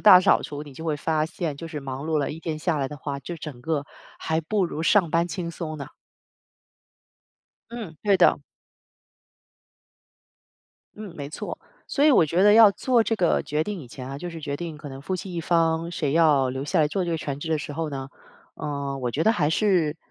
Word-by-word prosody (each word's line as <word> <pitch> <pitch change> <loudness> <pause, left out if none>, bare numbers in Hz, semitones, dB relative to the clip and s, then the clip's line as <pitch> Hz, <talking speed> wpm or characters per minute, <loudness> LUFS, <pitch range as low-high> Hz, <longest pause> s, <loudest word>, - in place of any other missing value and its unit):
大 185 -4 +9
扫 190 - +4
除， 145 0 -6
你 145 -2 -11
就 160 +5 -9
会 155 -2 0
发 155 +1 0
现， 160 -3 -4
就 165 +2 -7
是 155 -2 -5
忙 135 +1 -5
碌 160 -1 +1
了 145 - -1
一 160 +2 -7
天 160 -2 -3
下 165 -1 0
来 135 -1 -1
的 150 - -8
话， 140 0 -4
就 170 +5 -6
整 145 -6 -8
个 150 -2 -1 0.3
还 160 0 -1
不 195 +4 0
如 160 -1 -4
上 170 -2 +4
班 170 +1 +2
轻 175 -3 -4
松 160 -2 -5
呢。 140 +1 -6 1.8
嗯， 220 -10 -7
对 200 -2 +4
的。 180 - +4 2.6
嗯， 205 -5 -8
没 140 -1 -5
错， - - -6 0.3
所 285 - +1
以 305 - +7
我 165 - +5
觉 175 +6 +2
得 205 0 +7
要 220 -2 +9
做 240 +2 +2
这 225 - 0
个 180 -5 +2
决 150 +1 -1
定 200 -1 -4
以 130 - -10
前 130 +1 -8
啊， 135 +1 -6
就 175 +1 -5
是 165 -1 -8
决 145 -1 -3
定 165 -2 -6
可 150 -1 -9
能 135 0 -8
夫 185 - -2
妻 185 0 -7
一 170 - -2
方 165 0 +1
谁 145 -5 -1
要 150 -5 +4
留 135 +2 -3
下 155 +3 +1
来 150 - +3
做 185 +2 -1
这 170 - -2
个 165 - 0
全 140 -2 -4
职 160 - -6
的 155 - +2
时 145 - -6
候 160 0 -3
呢。 135 -1 -5 0.5
呃， 140 -2 -4
我 125 -2 -2
觉 155 - 0
得 220 - +5
还 150 -9 +1
是， 170 -5 +2
160 Hz, 240 characters per minute, -25 LUFS, 145-175 Hz, 2.6 s, 大